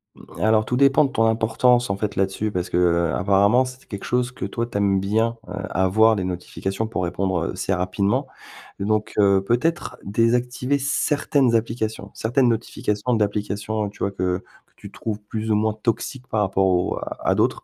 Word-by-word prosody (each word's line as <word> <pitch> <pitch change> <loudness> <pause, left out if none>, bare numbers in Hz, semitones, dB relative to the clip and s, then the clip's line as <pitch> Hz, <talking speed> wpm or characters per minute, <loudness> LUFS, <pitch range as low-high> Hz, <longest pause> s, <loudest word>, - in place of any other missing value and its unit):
Mmh, - - -14
alors 110 0 +4
tout 125 - -1
dépend 140 +2 +5
de 135 - -3
ton 115 - +2
importance, 115 +2 +2
en 100 - -1
fait, 105 0 -3
là-dessus, 95 +3 -1
parce 90 -3 -3
que, - - 0
heu, 85 -1 +2
apparemment, 100 +6 +3
c'est 130 +1 -10
quelque 100 -3 -7
chose 125 0 0
que - - -6
toi, 115 - -2
tu 115 - -5
aimes 100 -1 +2
bien, 110 +4 +1
heu, - - -8 0.2
avoir, 110 +4 +4
les 95 - -2
notifications, 95 +3 -3
pour 110 -5 -3
répondre, 90 -1 -1
heu, - - -3
assez 95 +1 -2
rapidement. 100 +8 0 0.5
Donc, 105 +2 0
heu, 100 -1 +4
peut-être 160 +10 0
désactiver 125 +5 +1
certaines 140 -2 +1
applications, 110 -2 -2
certaines 120 +3 +1
notifications 115 0 -1
d'applications, 105 0 -1
tu 100 - -17
vois, 100 - -1
que 90 -1 -2 0.2
que - - -36
tu - - -10
trouves 110 -2 -4
plus 110 +1 -4
ou - - +4
moins 110 +1 +2
toxiques 115 +4 -3
par 110 - 0
rapport 95 -1 +1
aux 90 -1 +1 0.2
à - - +1
d'autres. - - +1
110 Hz, 185 wpm, -22 LUFS, 95-120 Hz, 0.5 s, dépend